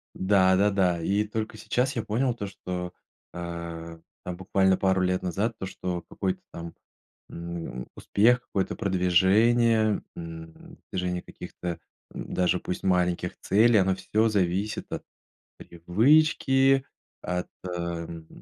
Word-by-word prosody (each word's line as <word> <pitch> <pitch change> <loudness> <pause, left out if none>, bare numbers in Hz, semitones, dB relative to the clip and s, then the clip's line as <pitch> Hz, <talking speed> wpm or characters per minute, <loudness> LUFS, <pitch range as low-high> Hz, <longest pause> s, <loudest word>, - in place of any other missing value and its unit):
Да, 95 -1 +4
да-да, 95 -4 +2
и 100 +4 +1
только 110 0 -4
сейчас 125 +4 -1
я 115 - -1
понял 120 +3 0
то, 105 -4 -5
что, 90 -2 -5 0.4
а, 85 -1 -6 0.2
там 90 -1 -4
буквально 95 0 +2
пару 95 -1 +2
лет 90 0 +1
назад, 105 +6 -1
то, 95 - -4
что 90 -2 -4
какой-то 95 -1 -2
там, 85 0 -7 0.6
м, 85 -7 -6
успех, 120 +4 +3
какое-то 95 -1 -2
продвижение, 105 +4 +3
м, 80 -1 -10
движение 90 -1 -2
каких-то, 85 -2 -7 0.3
м, - - -7
даже 90 0 +2
пусть 90 - -5
маленьких 90 -2 +1
целей- 110 +2 +4
оно 95 0 +2
всё 110 +3 +1
зависит 100 +1 0
от - - -4 0.5
привычки, 135 - +3 0.4
от, 90 0 -2 0.2
ам, 85 -2 -5
95 Hz, 125 wpm, -27 LUFS, 85-105 Hz, 0.6 s, Да